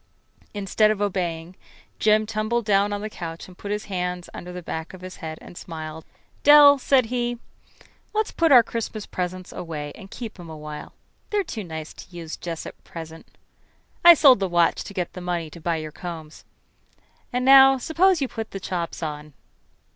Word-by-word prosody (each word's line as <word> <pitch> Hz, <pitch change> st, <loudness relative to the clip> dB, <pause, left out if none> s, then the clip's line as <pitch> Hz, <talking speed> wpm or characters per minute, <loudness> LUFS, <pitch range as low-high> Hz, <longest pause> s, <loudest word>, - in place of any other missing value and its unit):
Instead 205 Hz, +2 st, +2 dB
of 215 Hz, -2 st, 0 dB
obeying, 180 Hz, -4 st, -2 dB, 0.4 s
Jim 215 Hz, 0 st, +4 dB
tumbled 215 Hz, +2 st, -1 dB
down 200 Hz, -1 st, +3 dB
on 205 Hz, 0 st, -3 dB
the 215 Hz, -, -3 dB
couch 165 Hz, -3 st, -7 dB
and 185 Hz, -, -14 dB
put 200 Hz, -, -8 dB
his 210 Hz, +1 st, -2 dB
hand 180 Hz, -2 st, -3 dB
under 180 Hz, -, -8 dB
the 180 Hz, 0 st, -7 dB
back 160 Hz, +2 st, -5 dB
of 185 Hz, -, -14 dB
his 185 Hz, 0 st, -9 dB
head 160 Hz, -1 st, -6 dB
and -, -, -12 dB
smiled. 160 Hz, -2 st, -8 dB, 0.4 s
"Dell," 290 Hz, -1 st, +8 dB
said 260 Hz, -1 st, +3 dB
he, 240 Hz, -1 st, -1 dB, 0.7 s
"let's 435 Hz, 0 st, -1 dB
put 330 Hz, -2 st, +2 dB
our 245 Hz, -3 st, +9 dB
Christmas 225 Hz, -2 st, -5 dB
presents 185 Hz, 0 st, -5 dB
away 150 Hz, -4 st, -6 dB
and 195 Hz, -2 st, -12 dB
keep 225 Hz, -3 st, -8 dB
'em 170 Hz, -2 st, -10 dB
a 160 Hz, -, -8 dB
while. 150 Hz, 0 st, -8 dB, 0.4 s
They're 415 Hz, -1 st, +1 dB
too 220 Hz, -, -6 dB
nice 160 Hz, -3 st, -7 dB
to 180 Hz, -, -13 dB
use 165 Hz, -2 st, -6 dB
just 165 Hz, -2 st, -6 dB
at -, -, -11 dB
present. 165 Hz, -1 st, -10 dB, 0.8 s
I 345 Hz, 0 st, +11 dB
sold 275 Hz, -7 st, +7 dB
the 195 Hz, -1 st, -1 dB
watch 175 Hz, -1 st, +2 dB
to -, -, -8 dB
get 180 Hz, -2 st, -3 dB
the 180 Hz, -, -8 dB
money 175 Hz, -3 st, -3 dB
to 170 Hz, -, -12 dB
buy 170 Hz, +1 st, 0 dB
your 155 Hz, -1 st, -5 dB
combs. 160 Hz, -2 st, -8 dB, 0.9 s
And 250 Hz, 0 st, -1 dB
now 270 Hz, 0 st, +8 dB
suppose 335 Hz, +5 st, +2 dB
you -, -, 0 dB
put 225 Hz, -2 st, -6 dB
the 195 Hz, -, -6 dB
chops 175 Hz, -3 st, -4 dB
on." 150 Hz, -1 st, -6 dB
185 Hz, 190 wpm, -24 LUFS, 165-230 Hz, 0.9 s, I